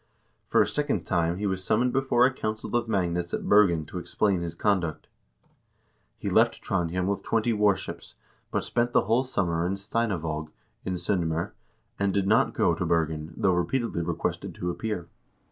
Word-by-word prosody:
For - - +4
a - - -3
second 150 -1 -1
time 85 -2 +1
he 105 - -3
was 95 -1 -1
summoned 120 +5 +2
before 135 -2 +3
a 130 - +2
council 110 -1 -3
of 120 -1 +1
magnates 90 -4 0
at - - -5
Bergen 90 -7 +4
to 90 - -6
explain 95 +1 0
his 85 -1 -4
conduct. 85 -5 0 1.1
He - - -6
left - - +3
Trondhjem 90 +1 -1
with 100 +1 -1
twenty 115 +1 +1
warships, 105 -2 0 0.3
but - - -1
spent 120 0 0
the - - +5
whole 115 +6 +1
summer 85 -9 0
in 90 +2 0
Steinavaag, 90 -7 -2 0.4
in 95 - -1
S0ndm0r, 85 -2 -1 0.5
and 100 0 +2
did 100 -1 +2
not 110 +3 +3
go - - +3
to - - -2
Bergen, 80 -1 -1
though 95 - +3
repeatedly 90 +3 0
requested 85 - -3
to 90 - -2
appear. 105 -4 -4
95 Hz, 170 wpm, -27 LUFS, 85-110 Hz, 1.1 s, the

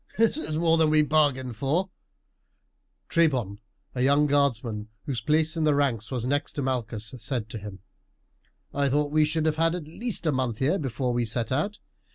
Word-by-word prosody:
"This 225 +2 +3
is 290 - -3
more 165 0 +3
than 160 -1 +4
we 155 0 +4
bargained 140 -6 +1
for," 165 - 0 1.2
Trebon, 130 - +1 0.3
a 125 - -2
young 140 +3 +4
guardsman 120 -7 0 0.2
whose 130 -4 -3
place 155 +1 +2
in 160 - 0
the 150 -2 +3
ranks 125 -6 0
was 125 -3 -3
next 145 +3 -1
to 145 - -3
Malchus, 115 -4 -2
said 115 -1 -3
to 115 -2 -6
him. 100 -2 -9 0.9
"I 140 -1 +1
thought 145 +2 +1
we 155 0 +4
should 155 +1 -1
have 155 -1 +1
had 165 +1 +2
at 175 -4 -5
least 220 +4 -5
a 155 - +3
month 130 -5 -1
here 145 - +1
before 130 -3 -2
we 120 0 +1
set 115 +1 -2
out. 155 +11 -1
140 Hz, 190 wpm, -26 LUFS, 120-155 Hz, 1.2 s, than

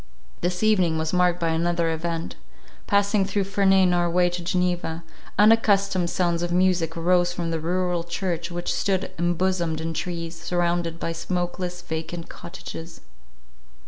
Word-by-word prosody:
This 180 +3 -1
evening 185 -7 +3
was 160 +1 -2
marked 180 -1 +3
by 165 -1 0
another 165 0 +1
event. 165 - -3 0.5
Passing 200 0 +3
through 200 +1 0
Ferney 195 -1 +3
in 180 -1 +3
our 175 0 +2
way 175 +1 +3
to 175 0 -4
Geneva, 175 -2 -1 0.3
unaccustomed 200 -4 +4
sounds 170 -2 0
of 175 0 -2
music 175 -2 +2
arose 175 +1 +3
from 170 -1 -3
the 165 - -1
rural 175 +1 0
church 170 -1 -3
which 175 0 -3
stood 195 -1 0
embosomed 175 -1 0
in 165 +1 -3
trees, 170 0 -4
surrounded 175 -1 -1
by 165 - -2
smokeless, 180 +1 -3
vacant 160 +1 -5
cottages. 170 -1 -9
175 Hz, 145 wpm, -24 LUFS, 170-185 Hz, 0.5 s, unaccustomed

